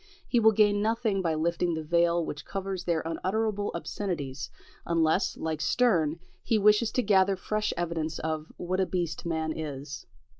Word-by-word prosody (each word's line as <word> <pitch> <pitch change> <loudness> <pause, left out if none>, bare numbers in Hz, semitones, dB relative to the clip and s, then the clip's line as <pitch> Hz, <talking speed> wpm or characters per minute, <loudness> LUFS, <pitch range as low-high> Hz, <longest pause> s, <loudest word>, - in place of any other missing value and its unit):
He 240 - +3
will 220 -1 +6
gain 205 -1 +4
nothing 220 -2 +1
by 165 -3 0
lifting 170 +2 0
the 160 - -4
veil 170 +1 +2
which 150 0 -6
covers 195 -2 -4
their 170 -2 +1
unutterable 205 +5 -1
obscenities, 150 -8 -4 0.3
unless, 165 +2 +1
like 160 -1 -3
Sterne, 165 - +2 0.2
he 225 - +1
wishes 210 +2 +4
to 250 - +1
gather 195 -1 +4
fresh 215 +3 -1
evidence 165 -2 -2
of 155 0 -3
"what 185 +1 -2
a 190 - +2
beast 170 -3 -2
man 160 -1 -1
is." 140 -4 -6
175 Hz, 160 wpm, -28 LUFS, 160-205 Hz, 0.3 s, will